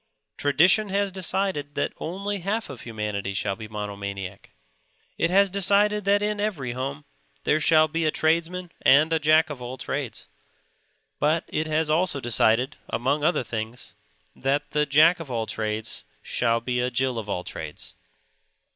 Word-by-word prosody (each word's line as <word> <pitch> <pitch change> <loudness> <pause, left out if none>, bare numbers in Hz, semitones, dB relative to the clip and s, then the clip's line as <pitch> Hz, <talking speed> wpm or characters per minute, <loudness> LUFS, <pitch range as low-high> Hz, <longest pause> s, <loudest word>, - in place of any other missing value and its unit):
Tradition 175 +9 +4
has 200 0 0
decided 185 -5 -1
that - - -1
only 200 +4 -3
half 200 +1 -2
of 130 - -9
humanity 105 -3 -4
shall 100 0 -1
be 110 0 -8
monomaniac. 100 -2 -6 0.7
It 165 - +1
has 195 +1 +4
decided 200 +1 +3
that 205 +1 +3
in 210 0 -1
every 175 - -2
home 135 +4 -5 0.4
there 155 - +2
shall 155 0 +5
be 165 +1 -1
a - - +3
tradesman 170 +3 0
and 155 +4 +5
a 160 - +2
Jack 155 +1 +4
of 135 -4 -7
all 125 +2 -6
trades. - - -5 0.9
But 155 +3 +2
it 155 +1 -1
has 155 0 +1
also 155 -1 +2
decided, 120 +1 +2
among 135 +6 0
other 155 -4 +2
things, 115 +1 -6 0.4
that 140 +2 -1
the 150 -1 +1
Jack 155 +5 +5
of 165 -4 -8
all 115 -3 -1
trades 110 0 -3 0.2
shall 115 -1 +1
be 125 +1 -1
a 125 +1 +1
Jill 125 -1 0
of 105 -2 -7
all 90 -2 -2
trades. 75 -4 -7
145 Hz, 160 wpm, -25 LUFS, 115-175 Hz, 0.9 s, shall